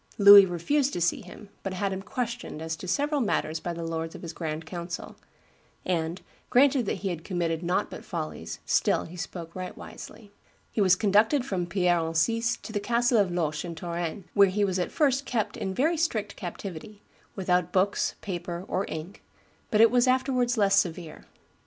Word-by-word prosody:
Louis 200 -1 +10
refused 260 - 0
to - - -2
see 175 0 +1
him, 195 +3 -12
but 195 -1 -4
had 195 +1 -1
him 190 - -4
"questioned 235 -3 -4
as 160 0 -3
to 185 - -8
several 290 - 0
matters 160 -8 0
by 175 - -4
the 170 0 -5
lords 165 0 -4
of - - -10
his 165 -1 -6
grand 160 -1 -4
council; 170 +1 -6 0.7
and, 170 0 -2 0.3
granted 260 -2 +4
that - - 0
he - - +1
had 170 -3 -5
committed 170 -3 -2
nought 180 +1 -1
but - - -8
follies, 155 - -5
still - - +2
he 170 - -10
spoke 170 -1 -7
right 185 -1 -6
wisely." 205 -3 -11 0.4
He 215 - 0
was 185 -2 +5
conducted 220 +7 +3
from 180 -7 -2
Pierre 175 -1 +2
Encise 225 +9 0
to 220 - -8
the 205 - 0
castle 235 +2 +2
of 200 -3 +3
Loches 155 -4 -1
in 170 -2 -6
Touraine, 170 +3 -4
where 200 -1 +6
he 205 +2 +1
was 190 -1 -1
at 180 - -2
first 280 -3 +1
kept 220 -4 -1
in 190 - -3
very 305 - +1
strict 225 -11 -1
captivity, 195 +2 -8 0.3
"without 180 -2 +1
books, 195 +2 +1
paper, 175 -2 -5
or 195 - -1
ink," 160 +5 -7 0.5
but 215 - +3
it 225 -1 +7
was 245 +1 +3
afterwards 255 -1 +1
less 200 -2 +4
severe. 170 -2 -4
190 Hz, 190 wpm, -27 LUFS, 170-220 Hz, 0.7 s, Louis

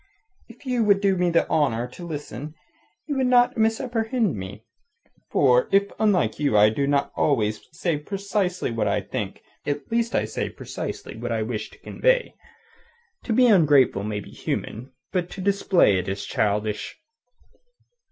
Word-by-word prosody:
"If 245 +4 -16
you 250 -3 +1
would 200 -2 +4
do 195 -1 +2
me 180 -1 +1
the 170 0 +2
honour 125 -6 +1
to 175 +7 -9
listen, 150 -1 -6 0.5
you 290 -3 -3
would 260 -1 +2
not 245 0 +4
misapprehend 225 - 0
me. 100 +3 -8 0.6
For - - +3
if 200 0 +3
unlike 205 -8 +2
you 140 -8 +2
I 105 +1 +7
do 140 +6 -1
not 140 0 +1
always 110 -7 +1
say 160 0 -1
precisely 195 - -2
what 110 -2 -1
I 100 +1 +1
think, 95 +1 -5 0.2
at 145 +3 -4
least 230 0 0
I - - +2
say - - -3
precisely - - -7
what 120 +2 -5
I 110 -1 0
wish 110 -1 -4
to - - -18
convey. - - 0 0.9
To - - -3
be 250 +3 +5
ungrateful 145 - +4
may 105 0 -3
be - - -13
human; 125 +5 -5 0.2
but 180 -2 -1
to - - -9
display 190 - +3
it 90 - -5
is 95 +1 -3
childish." 105 0 -1
160 Hz, 160 wpm, -24 LUFS, -, 0.9 s, I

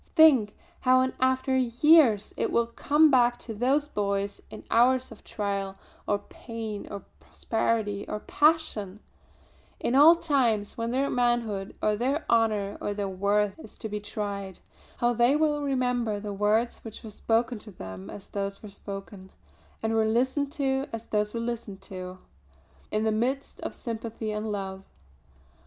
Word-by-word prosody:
Think, 265 -10 +6 0.2
how 255 0 +4
in 260 0 0
after 260 0 +2
years 250 -3 +4
it - - -1
will 235 - +3
come 295 +6 +3
back 245 -2 +4
to 225 - -7
those 265 +7 +1
boys 200 -4 -2
in - - -10
hours 255 +2 +3
of 225 - -13
trial, 200 -2 -3 0.3
or 205 - +2
pain, 220 -1 -7
or 200 -2 -7 0.2
prosperity, 220 -3 -2
or 210 - -3
passion; 290 - +1 0.8
in 235 - -1
all 300 +5 +8
times 250 -11 +1
when 230 0 -2
their 265 +3 +1
manhood 240 -5 0
or 210 0 +3
their 270 +8 -1
honour 215 -3 +1
or 205 - -2
their 200 -1 -2
worth 200 +4 0
is - - -11
to 225 - -5
be 210 0 -3
tried; 200 -2 -5 0.4
how 240 0 +2
they 240 +4 +4
will 300 -1 +1
remember 250 -6 0
the 205 0 -5
words 210 +4 +1
which 225 -2 -10
were 220 - -8
spoken 230 +2 0
to 215 - -9
them 95 - -9
as 195 - -9
those 200 0 -4
were 210 - -8
spoken, 195 -1 -9 0.5
and 220 0 0
were 220 -1 +3
listened 260 +5 +1
to 270 -2 0
as 230 0 -5
those 210 0 0
were 230 - -3
listened 230 -4 -4
to, 185 -1 -7 0.7
in 215 0 0
the 220 - +2
midst 255 +6 -2
of - - -5
sympathy 225 -1 -5
and 210 0 -3
love. 195 -1 -4
225 Hz, 160 wpm, -27 LUFS, 205-255 Hz, 0.8 s, all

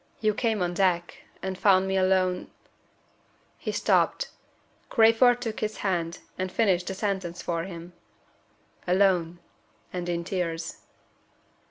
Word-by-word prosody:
You 215 -1 +2
came 220 -3 0
on 175 0 -1
deck, 175 -2 0 0.2
and 190 0 -2
found 190 -1 +4
me 190 - 0
alone 185 -1 +2 0.6
" - - -37
He - - 0
stopped. - - +1 0.6
Crayford 240 +1 +5
took 225 -2 -4
his 215 0 -2
hand, 170 -3 -1 0.2
and 185 0 -2
finished 185 -5 +2
the 190 - -3
sentence 190 -4 -3
for 170 -1 -2
him. 175 -1 -9 0.9
"Alone 180 -2 +2 0.6
and 175 -1 -3
in 170 0 -1
tears." 170 -3 -3
185 Hz, 130 wpm, -27 LUFS, 175-205 Hz, 0.9 s, Crayford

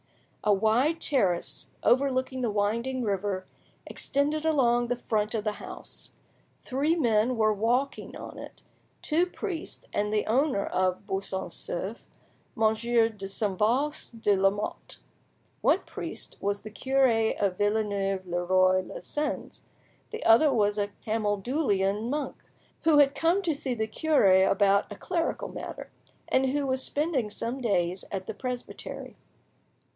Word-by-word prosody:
A 210 - +3
wide 225 +11 +3
terrace, 195 - 0
overlooking 260 0 +2
the 240 - +1
winding 230 +5 0
river, 195 -2 -1 0.4
extended 295 +2 -1
along 240 -6 +3
the 245 - 0
front 215 -2 -1
of 215 - -1
the 215 - 0
house. - - -10 0.5
Three 285 +6 +1
men 235 -4 +2
were 215 -1 +3
walking 240 +6 -1
on - - -8
it - - -11 0.4
two 335 +4 +2
priests, 360 -2 -6
and 210 0 0
the 215 -1 +1
owner 255 -2 +1
of 185 +1 0
Buisson 195 -1 -3
Souef, - - -4 0.6
Monsieur 225 +1 +3
de 200 -3 -8
Saint 195 -1 -2
Faust 245 +2 0
de 205 - +4
Lamotte. 195 +2 -1 0.6
One - - +3
priest - - -7
was 200 0 -1
the 215 - -8
cure 265 +4 +2 0.3
of 195 -3 0
Villeneuve 200 -2 0
le 175 0 -2
Roi 185 +1 +4
lez 185 - -9
Sens, 295 0 -3 0.5
the 445 - -6
other 235 +7 +6
was 210 -4 +2
a 205 - +1 0.2
Camaldulian 210 -1 0
monk, 285 -1 -2 0.5
who 320 -2 +6
had 285 -1 +6
come 330 +7 +2
to 335 -3 +1
see 275 -3 -2
the 220 -1 -1
cure 215 -7 +4
about 200 +1 +3
a - - -5
clerical 340 -2 -2
matter, - - -7 0.4
and 265 0 +2
who 285 +2 0
was 260 -1 0
spending 285 -6 -1
some 235 +5 -4
days 185 -5 0
at 190 -2 -3
the - - -5
presbytery. 250 -2 -6
225 Hz, 140 wpm, -28 LUFS, 205-270 Hz, 0.6 s, other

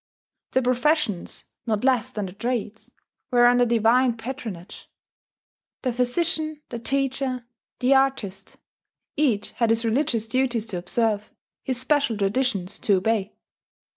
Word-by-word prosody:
The 260 - +3
professions, 250 - 0 0.2
not 215 -1 0
less 255 -2 +2
than 210 -5 -4
the 180 - -8
trades, 225 0 -4 0.4
were 240 -1 +5
under 245 0 +5
divine 235 +2 +3
patronage: 225 -7 -7 0.9
the 255 -3 0
physician, 310 +4 0
the 235 - -5
teacher, 265 -1 -1 0.3
the 255 +2 +3
artist 265 -8 0 0.6
each 255 -9 +1
had 230 -2 0
his 225 +1 +2
religious 230 -1 +1
duties 240 -1 0
to 195 -6 -4
observe, 210 +3 0 0.3
his 255 -2 -1
special 260 -3 +1
traditions 200 -2 0
to 205 - +3
obey. 205 +1 -1
240 Hz, 125 wpm, -24 LUFS, 215-260 Hz, 0.9 s, were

